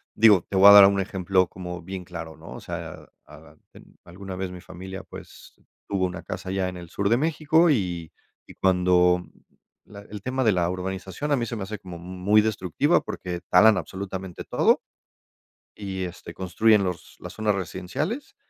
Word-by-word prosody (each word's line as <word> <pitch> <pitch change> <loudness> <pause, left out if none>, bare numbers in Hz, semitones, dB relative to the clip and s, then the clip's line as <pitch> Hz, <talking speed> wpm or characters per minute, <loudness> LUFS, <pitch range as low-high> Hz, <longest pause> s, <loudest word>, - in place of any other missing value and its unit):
digo, 105 -5 +6
te - - -5
voy 95 +1 +7
a - - +11
dar 100 -1 +11
un 100 0 +3
ejemplo 95 -1 +1
como 90 -1 -8
bien 95 +1 -7
claro, 85 -3 -8
¿no? 80 +1 -12
O - - -8
sea, - - -6
a - - -14 0.2
a - - -14 0.2
a - - -28 0.2
en - - -18
alguna 95 +2 -9
vez 95 0 -4
mi 90 -1 -10
familia, 95 +1 -9
pues, - - -13 0.3
tuvo 95 -2 0
una 90 -1 -5
casa 95 - -7
allá 95 -1 -1
en 90 - -8
el 85 -1 -10
sur 100 +3 -1
de 115 - +4
México 160 +3 +2
y 90 - -2 0.3
y - - -13
cuando 90 -1 +3 0.6
la 100 -1 -12
el 105 0 -10
tema 130 +4 -2
de 110 - +4
la 90 -3 +1
urbanización 95 +8 -4
a - - +5
mí 120 -3 -1
se 120 - -4
me 105 - -4
hace 105 +2 -6
como 90 -3 -10
m 85 - -12
muy 95 +4 +2
destructiva, 110 - +1
porque 90 -1 -6
talan 105 +3 +6
absolutamente 95 -2 -6
todo - - +2 0.9
y, 95 -2 -5
este, 90 -1 -8
construyen 100 +4 +2
los 90 -3 -5
las - - -9
zonas 105 -2 0
residenciales 150 - -4
95 Hz, 195 wpm, -25 LUFS, 90-105 Hz, 0.9 s, a